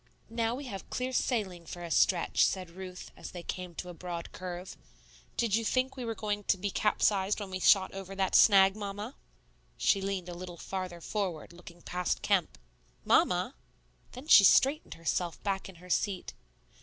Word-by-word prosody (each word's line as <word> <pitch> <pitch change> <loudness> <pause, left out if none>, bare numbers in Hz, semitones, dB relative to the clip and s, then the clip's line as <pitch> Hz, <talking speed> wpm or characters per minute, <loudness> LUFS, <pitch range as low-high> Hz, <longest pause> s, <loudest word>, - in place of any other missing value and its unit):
"Now 230 0 0
we 280 +2 -7
have 195 -6 -7
clear 255 +1 -3
sailing 190 -11 -1
for 175 - -7
a 170 - -6
stretch," 175 +1 +3
said 185 -3 0
Ruth, 185 0 -9
as - - -9
they 175 -1 -7
came 180 -1 -6
to 180 - -6
a - - -7
broad 170 0 -6
curve. 180 0 -7 0.6
"Did 230 -4 +2
you 230 - +1
think 255 +4 +1
you 250 -3 -5
were 225 - -2
going 205 +1 -2
to - - +2
be 200 +2 -2
capsized 205 -1 +1
when 200 -2 -6
we 185 - -3
shot 190 0 +5
over 195 0 -7
that 190 -1 0
snag, 195 -2 +7
Mamma?" 205 +4 -6 0.6
She 195 - +2
leaned 195 -2 -3
a 175 - -6
little 175 0 -8
farther 185 -1 -5
forward, 180 -5 -3
looking 175 0 -14
past 180 -1 -2
Kemp. - - +1 0.5
"Mamma!" - - +3 0.6
Then 255 +3 -9
she 205 - +9
straightened 275 - +4
herself 165 +1 -2
back 195 -1 -2
in 190 - -12
her 180 +2 -15
seat. 195 -1 -1
190 Hz, 180 wpm, -30 LUFS, 180-210 Hz, 0.6 s, she